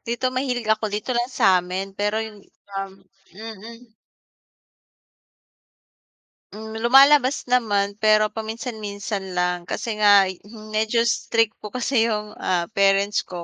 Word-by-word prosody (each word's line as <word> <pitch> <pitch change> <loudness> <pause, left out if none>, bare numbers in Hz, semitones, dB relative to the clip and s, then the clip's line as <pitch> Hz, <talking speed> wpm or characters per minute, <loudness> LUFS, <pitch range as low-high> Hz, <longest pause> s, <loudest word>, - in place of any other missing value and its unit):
dito 245 +2 -2
mahilig 255 -2 -2
ako 220 0 0
dito 210 +5 -3
lang 240 0 -1
sa'min, 190 -4 +1
pero 205 +2 -2
yun, 210 -2 -11 0.3
um 195 0 -5 0.4
mm. 225 +2 -11 2.6
Hmm, 220 +1 -8
lumalabas 270 +3 +5
naman 205 -4 +1
pero 215 0 +3
paminsan-minsan 215 -4 -6
lang, 180 0 -1
kasi 220 -2 -4
nga'y, 200 -3 +4
hmm, 215 -1 -12
medyo 220 +2 +1
strict 230 -1 +1
po - - -8
kasi 240 -2 +1
yung, 210 -1 -3
ah, 175 +2 -1
parents 200 0 +2
ko 175 -2 -7
215 Hz, 120 wpm, -22 LUFS, 200-230 Hz, 2.6 s, lumalabas